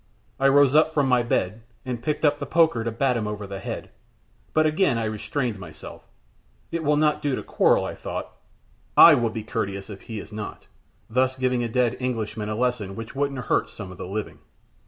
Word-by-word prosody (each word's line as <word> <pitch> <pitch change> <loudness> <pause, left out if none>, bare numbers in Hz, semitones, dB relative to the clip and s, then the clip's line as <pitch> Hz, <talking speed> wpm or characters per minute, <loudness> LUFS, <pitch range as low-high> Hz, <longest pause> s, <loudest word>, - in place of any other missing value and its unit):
I 135 - +4
rose 140 -1 +5
up 155 +1 +4
from 145 -3 +3
my 125 -1 +4
bed, 110 -2 -1 0.2
and 125 -2 -4
picked 150 +3 -1
up 145 0 +3
the - - -4
poker 160 -9 +3
to 115 - -1
bat 125 +3 +1
him 110 -3 -1
over 105 -1 -4
the 100 0 -6
head, - - -6 0.6
but 155 0 +3
again 155 -4 +2
I 115 - -1
restrained 110 +1 -2
myself. 90 - -11 0.6
It 165 -1 -2
will 150 0 +3
not 150 0 +2
do 145 -3 0
to - - -5
quarrel, - - +3
I - - -4
thought. - - -6 0.7
I 170 - +11
will 120 -5 +2
be 110 -1 -5
courteous 100 -2 -4
if 100 - -9
he 110 -2 -6
is - - -10
not, 105 -1 -7 0.4
thus 130 +2 +1
giving 130 -1 +1
a 120 - -2
dead 125 0 +1
Englishman 110 -4 -3
a 105 - -2
lesson 115 -5 -1
which 115 +1 -7
wouldn't 135 -3 -2
hurt - - +1
some 95 -4 -8
of 90 - -12
the - - -5
living. 105 +2 -5
120 Hz, 210 wpm, -24 LUFS, 105-140 Hz, 0.7 s, I